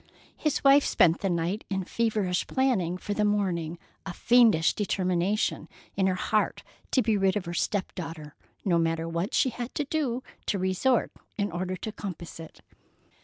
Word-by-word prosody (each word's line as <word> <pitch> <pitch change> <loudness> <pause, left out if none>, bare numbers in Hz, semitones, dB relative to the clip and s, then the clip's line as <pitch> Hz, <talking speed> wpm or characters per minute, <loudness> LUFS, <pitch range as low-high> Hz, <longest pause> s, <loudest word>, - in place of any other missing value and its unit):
His 305 -2 -1
wife 280 +1 +7
spent 165 -1 +3
the 195 - -1
night 175 +4 -1
in 190 -1 -1
feverish 210 -4 0
planning 220 -10 +1
for 205 - -4
the 210 - 0
morning, 180 -6 0 0.3
a 190 - -6
fiendish 230 -9 +4
determination 190 +1 0 0.3
in 190 -1 +2
her 185 - +1
heart 215 +3 0 0.3
to 260 - +4
be 220 0 +2
rid 195 +1 +2
of 200 - -4
her 170 - -5
step 195 +2 -1
daughter, 160 -4 -7 0.3
no 175 -4 +3
matter 165 0 0
to 165 - -4
what 170 +7 -2
she 260 - +3
had 240 +1 -5
to 285 -4 -1 0.3
resort 190 +6 +1 0.3
in 205 -2 -1
order 185 +2 -3
to 215 +4 -5
compass 180 -6 -7
it. 160 -1 -11
190 Hz, 170 wpm, -27 LUFS, 175-220 Hz, 0.3 s, wife